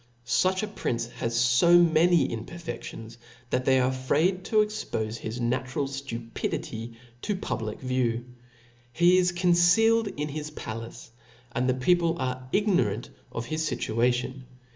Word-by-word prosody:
Such 185 Hz, -, +2 dB
a -, -, -1 dB
prince 120 Hz, -, -2 dB
has 120 Hz, +1 st, +1 dB
fo 175 Hz, +3 st, +7 dB
many 170 Hz, 0 st, +4 dB
impcrfeftions, 115 Hz, -3 st, -7 dB, 0.3 s
that 125 Hz, 0 st, 0 dB
they 130 Hz, -1 st, +4 dB
are 130 Hz, 0 st, +2 dB
afraid 155 Hz, +8 st, +1 dB
to 215 Hz, -1 st, +3 dB
expofe 115 Hz, -, -4 dB
his 110 Hz, +2 st, -5 dB
natural 130 Hz, +4 st, -1 dB
ftupidity 115 Hz, -3 st, -5 dB, 0.3 s
to 210 Hz, -, -1 dB
public 110 Hz, -, -4 dB
view. 125 Hz, -2 st, -1 dB, 0.7 s
He 175 Hz, +7 st, +4 dB
is 180 Hz, -1 st, +2 dB
concealed 180 Hz, +6 st, +4 dB
in 150 Hz, -5 st, -4 dB
his 150 Hz, +1 st, -5 dB
palace, 115 Hz, -5 st, -8 dB, 0.4 s
and 125 Hz, +2 st, 0 dB
the 130 Hz, -, +2 dB
people 170 Hz, +5 st, +2 dB
are 130 Hz, -2 st, -4 dB
ignorant 125 Hz, -, +1 dB, 0.2 s
of 115 Hz, -, -4 dB
his 155 Hz, +4 st, -2 dB
fituation. 125 Hz, +2 st, 0 dB
130 Hz, 135 wpm, -27 LUFS, 120-175 Hz, 0.7 s, fo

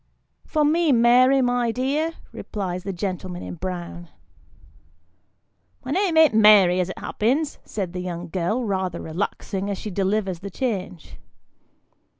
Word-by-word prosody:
" -, -, -49 dB
For 305 Hz, -2 st, +1 dB
me, 320 Hz, +1 st, +3 dB
Mary, 255 Hz, +2 st, +5 dB
my 245 Hz, -1 st, +1 dB
dear," 285 Hz, +7 st, -1 dB, 0.2 s
replies 185 Hz, -3 st, -5 dB
the 195 Hz, -, -3 dB
gentleman 185 Hz, -1 st, -5 dB
in -, -, -6 dB
brown. 175 Hz, -1 st, -6 dB, 1.2 s
" 90 Hz, -, -42 dB
My 260 Hz, -, -4 dB
name 360 Hz, 0 st, +1 dB
an't 320 Hz, -6 st, +6 dB
Mary 210 Hz, -4 st, +6 dB
as 180 Hz, 0 st, 0 dB
it -, -, -7 dB
happens," 275 Hz, +8 st, -1 dB
says 190 Hz, -5 st, -4 dB
the 180 Hz, 0 st, -5 dB
young 175 Hz, -1 st, -5 dB
girl, 195 Hz, +8 st, -1 dB
rather 190 Hz, -4 st, -2 dB
relaxing 190 Hz, +3 st, -4 dB
as 200 Hz, -, -2 dB
she 210 Hz, -, -6 dB
delivers 195 Hz, -1 st, -1 dB
the 200 Hz, +2 st, -7 dB
change. 190 Hz, -, -4 dB
200 Hz, 150 wpm, -23 LUFS, 180-250 Hz, 1.2 s, an't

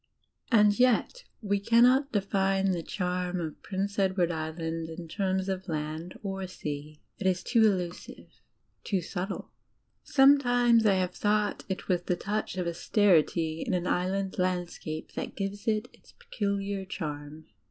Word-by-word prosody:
And 210 Hz, -1 st, +5 dB
yet 255 Hz, -, +2 dB, 0.2 s
we 200 Hz, -1 st, +1 dB
cannot 245 Hz, +6 st, +4 dB
define 195 Hz, -1 st, +1 dB
the 175 Hz, -2 st, -1 dB
charm 180 Hz, 0 st, -2 dB
of 160 Hz, -3 st, -5 dB
Prince 200 Hz, +1 st, -3 dB
Edward 190 Hz, -3 st, +2 dB
Island 160 Hz, 0 st, -4 dB
in 165 Hz, +1 st, -7 dB
terms 190 Hz, +1 st, -1 dB
of 190 Hz, 0 st, -3 dB
land 155 Hz, +4 st, -4 dB
or 195 Hz, -1 st, -3 dB
sea. 150 Hz, -3 st, -7 dB, 0.2 s
It 190 Hz, -, 0 dB
is 185 Hz, -1 st, +1 dB
too 230 Hz, -, +2 dB
elusive 180 Hz, -2 st, -6 dB, 0.4 s
hk> 190 Hz, -4 st, -1 dB
subtle. 190 Hz, +3 st, -5 dB, 0.5 s
Sometimes 245 Hz, -5 st, +5 dB
I 195 Hz, -, +4 dB
have 185 Hz, -1 st, 0 dB
thought 210 Hz, 0 st, 0 dB
it 190 Hz, -, -4 dB
was 180 Hz, -2 st, +1 dB
the 180 Hz, -, -1 dB
touch 205 Hz, +1 st, -3 dB
of 180 Hz, -, -1 dB
austerity 170 Hz, -2 st, +2 dB
in -, -, -1 dB
an 180 Hz, 0 st, -1 dB
Island 190 Hz, +2 st, -1 dB
landscape 175 Hz, -3 st, -2 dB
that -, -, -5 dB
gives 200 Hz, +1 st, -4 dB
it 215 Hz, +1 st, +1 dB
its -, -, -21 dB
peculiar 200 Hz, -1 st, -3 dB
charm. 155 Hz, -4 st, -6 dB
190 Hz, 145 wpm, -29 LUFS, 175-205 Hz, 0.5 s, And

